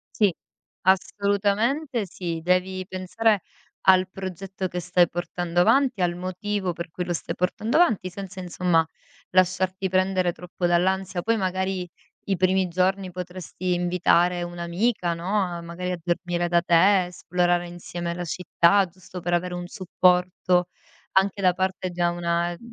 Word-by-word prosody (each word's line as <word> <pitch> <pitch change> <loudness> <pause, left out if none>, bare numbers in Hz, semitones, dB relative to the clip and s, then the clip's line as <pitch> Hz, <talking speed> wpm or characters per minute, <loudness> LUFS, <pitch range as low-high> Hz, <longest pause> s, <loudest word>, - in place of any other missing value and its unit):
Sì, 205 -6 +3 0.5
assolutamente 205 - +1
sì. 170 -3 -5
Devi 185 +1 +1
pensare 195 +2 +1 0.4
al 185 -1 +6
progetto 190 0 -5
che 180 - -4
stai 175 0 +3
portando 175 0 -1
avanti, 255 0 +3
al 175 -1 +1
motivo 185 +1 -3
per 170 -1 -7
cui 180 - -4
lo 175 - -2
stai 165 - -4
portando 215 - 0
avanti, 225 - +3
senza 195 +1 -8
insomma 175 -2 +1 0.4
lasciarti 185 +1 +1
prendere 185 -1 +1
troppo 180 0 -5
dall'ansia. 185 +1 +1
Poi 225 +4 +1
magari 190 -1 -2 0.4
i 195 - 0
primi 185 +1 +2
giorni 185 +2 0
potresti 180 0 -4
invitare 175 0 +2
un'amica, 175 +3 -1
no, 190 +5 0
a 175 -2 -3
magari 170 +2 -5
a 180 - -5
dormire 175 0 -1
da 170 0 +3
te, 185 +2 +4
esplorare 175 0 0
insieme 175 0 -5
la 175 +1 -5
città, 180 +3 +3
giusto 180 +1 -11
per 175 +1 -2
avere 180 +1 0
un 175 0 -5
supporto 180 -1 +2 0.5
anche 195 +1 +2
da 185 -2 +4
parte 185 +1 -2
da 175 -1 0
una, 170 0 0
ehm, 175 - -7
180 Hz, 145 wpm, -25 LUFS, 175-190 Hz, 0.5 s, al